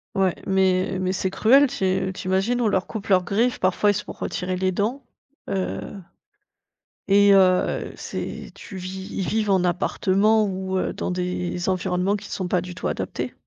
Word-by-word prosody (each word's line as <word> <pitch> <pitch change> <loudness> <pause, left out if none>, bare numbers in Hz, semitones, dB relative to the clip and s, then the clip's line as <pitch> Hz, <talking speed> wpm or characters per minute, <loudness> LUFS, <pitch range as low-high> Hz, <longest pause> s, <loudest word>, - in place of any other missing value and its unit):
Ouais, 190 -2 +2
mais 190 0 +2
mais 185 0 0
c'est 190 0 -1
cruel, 265 +9 +5
tu 190 -7 -1
i - - -5
tu 185 - -7
imagines, 195 +6 +1
on 230 - +2
leur 190 -3 0
coupe 220 -1 -6
leurs 185 -1 +4
griffes 225 +7 0
parfois, 185 +3 +2
ils - - 0
se 210 - -3
font - - -8
retirer 185 0 -3
les 185 0 +1
dents, 230 +9 -2 0.5
heu, 190 -1 -2 1.3
et 200 0 +6
heu, 185 -1 +3
c'est - - -6
tu 195 - -9
vis 190 +1 -6
ils 190 - -3
vivent 215 -2 0
en 190 -2 +3
appartement 200 +4 +2
ou 190 -1 -3
heu, - - -2
dans - - -3
des 180 0 -3
environnements 185 +1 0
qui 205 0 -8
sont 185 - -3
pas 180 -1 +1
du 180 0 -8
tout - - -3
adaptés. - - -3
190 Hz, 185 wpm, -23 LUFS, 185-205 Hz, 1.3 s, et